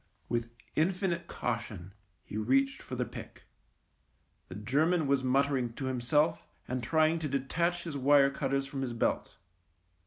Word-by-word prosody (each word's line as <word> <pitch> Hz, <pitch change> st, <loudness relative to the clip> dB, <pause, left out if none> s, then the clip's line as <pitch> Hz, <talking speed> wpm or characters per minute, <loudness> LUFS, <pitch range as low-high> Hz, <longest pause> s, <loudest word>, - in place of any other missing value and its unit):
With 115 Hz, -1 st, -1 dB, 0.3 s
infinite 175 Hz, +1 st, 0 dB
caution 110 Hz, -6 st, -4 dB, 0.3 s
he -, -, -9 dB
reached 135 Hz, +5 st, +2 dB
for -, -, -6 dB
the -, -, -1 dB
pick. -, -, -10 dB, 1.0 s
The -, -, -9 dB
German 150 Hz, -, +2 dB
was 140 Hz, -1 st, +2 dB
muttering 130 Hz, -2 st, +2 dB
to 135 Hz, -, -5 dB
him 130 Hz, -2 st, -2 dB
self 150 Hz, +6 st, +2 dB, 0.2 s
and 125 Hz, 0 st, -2 dB
trying 160 Hz, +6 st, +3 dB
to 155 Hz, -, -2 dB
detach 170 Hz, +6 st, 0 dB
his 165 Hz, -4 st, -5 dB
wire 140 Hz, 0 st, +5 dB
cutters 135 Hz, -1 st, -1 dB
from 135 Hz, 0 st, -5 dB
his 125 Hz, -3 st, -2 dB
belt. 115 Hz, -, -1 dB
135 Hz, 150 wpm, -31 LUFS, 125-155 Hz, 1.0 s, wire